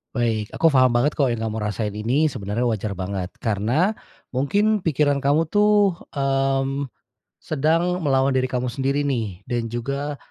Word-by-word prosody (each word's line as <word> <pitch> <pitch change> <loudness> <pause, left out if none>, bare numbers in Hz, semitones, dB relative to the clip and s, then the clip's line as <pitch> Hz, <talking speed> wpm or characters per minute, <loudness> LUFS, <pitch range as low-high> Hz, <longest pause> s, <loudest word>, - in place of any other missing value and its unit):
Baik 115 -3 -1
aku 165 - +2
faham 130 -5 +4
banget 120 +5 +1
kok 135 -5 +2
yang 115 - -2
kamu 110 0 -4
rasain 105 0 -2
ini 125 +9 +1
sebenarnya 110 -2 -2
wajar 110 -2 -2
banget. 95 -1 -4
Karena, 120 - +1 0.4
mungkin 205 +10 +1
pikiran 145 -2 +1
kamu 150 +4 +2
tuh, 205 0 +3 0.2
mmm, 135 -1 0 0.5
sedang 165 +5 +1
melawan 135 -3 +2
diri 130 0 +1
kamu 125 -1 -2
sendiri 140 +3 0
nih, 110 -9 -3
dan 120 -1 -2
juga, 140 +5 -3
135 Hz, 150 wpm, -22 LUFS, 115-150 Hz, 0.5 s, faham